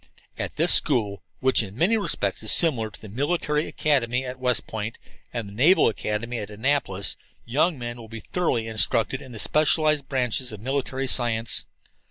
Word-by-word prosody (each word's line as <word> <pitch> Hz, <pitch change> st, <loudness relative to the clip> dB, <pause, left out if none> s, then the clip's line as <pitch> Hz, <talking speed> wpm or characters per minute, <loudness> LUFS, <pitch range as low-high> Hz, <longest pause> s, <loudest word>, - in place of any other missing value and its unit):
"At -, -, -5 dB
this -, -, +5 dB
school, 105 Hz, -8 st, +3 dB, 0.2 s
which 130 Hz, -1 st, +4 dB
in 100 Hz, 0 st, -8 dB
many 185 Hz, -, +3 dB
respects 210 Hz, -, -1 dB
is -, -, +2 dB
similar 125 Hz, -10 st, +4 dB
to -, -, -13 dB
the 110 Hz, -, -11 dB
Military 150 Hz, -, -1 dB
Academy 130 Hz, -4 st, 0 dB
at 130 Hz, 0 st, -7 dB
West 125 Hz, -2 st, 0 dB
Point 110 Hz, +1 st, -5 dB, 0.3 s
and 115 Hz, -4 st, -4 dB
the 100 Hz, -, -11 dB
Naval 150 Hz, -, +5 dB
Academy 115 Hz, +2 st, -3 dB
at 105 Hz, -, -6 dB
Annapolis, 105 Hz, -3 st, -1 dB, 0.3 s
young 150 Hz, +7 st, +1 dB
men 120 Hz, -1 st, -6 dB
will 115 Hz, -2 st, -11 dB
be 115 Hz, 0 st, -8 dB
thoroughly 125 Hz, -11 st, 0 dB
instructed 115 Hz, +3 st, +1 dB
in 130 Hz, -, -11 dB
the 115 Hz, -, -8 dB
specialized 155 Hz, +1 st, +2 dB
branches 125 Hz, -1 st, 0 dB
of 105 Hz, -, -8 dB
military 135 Hz, +2 st, -2 dB
science. 115 Hz, -4 st, 0 dB
125 Hz, 175 wpm, -24 LUFS, 110-140 Hz, 0.3 s, this